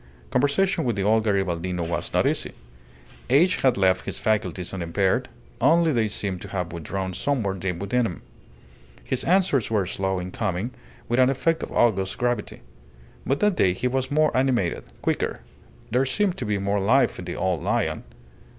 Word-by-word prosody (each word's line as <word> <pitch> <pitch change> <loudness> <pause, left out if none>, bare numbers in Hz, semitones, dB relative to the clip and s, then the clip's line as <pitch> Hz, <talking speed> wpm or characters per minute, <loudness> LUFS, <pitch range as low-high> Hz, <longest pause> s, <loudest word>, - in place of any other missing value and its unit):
Conversation 145 +7 +2
with 120 -5 0
the 100 - -1
old 110 +2 +3
Garibaldino 90 -4 -1
was 85 - -3
not - - +2
easy. - - -1 0.8
Age 160 +8 +4
had 130 -5 +2
left 95 -1 +2
his - - -3
faculties 95 -5 -1
unimpaired, 95 +7 0 0.3
only 165 +5 +4
they 115 -5 +1
seemed 100 -3 -3
to - - -7
have 90 -3 -4
withdrawn 95 +3 -4
somewhere 110 -2 0
deep 90 -2 -3
within 115 +6 0
him. 90 - -8 0.8
His 130 - -1
answers 175 - +2
were 105 -4 +1
slow 95 +1 -2
in 90 0 -5
coming, 105 +3 -2 0.4
with 120 +2 +1
an 130 0 +5
effect 160 +5 +1
of - - -5
august 95 -5 +2
gravity. 120 -3 -2 0.7
But 135 - 0
that 210 -2 +3
day 90 - +3
he 125 - -1
was 130 +1 -1
more 155 +1 +2
animated, 130 -9 +1 0.2
quicker; - - -1 0.5
there 130 +3 +2
seemed 195 +5 +1
to - - -4
be 105 -1 +1
more 100 +1 0
life 120 +8 +3
in - - -6
the - - -5
old 90 -4 -1
lion. - - -1
105 Hz, 175 wpm, -24 LUFS, 95-130 Hz, 0.8 s, an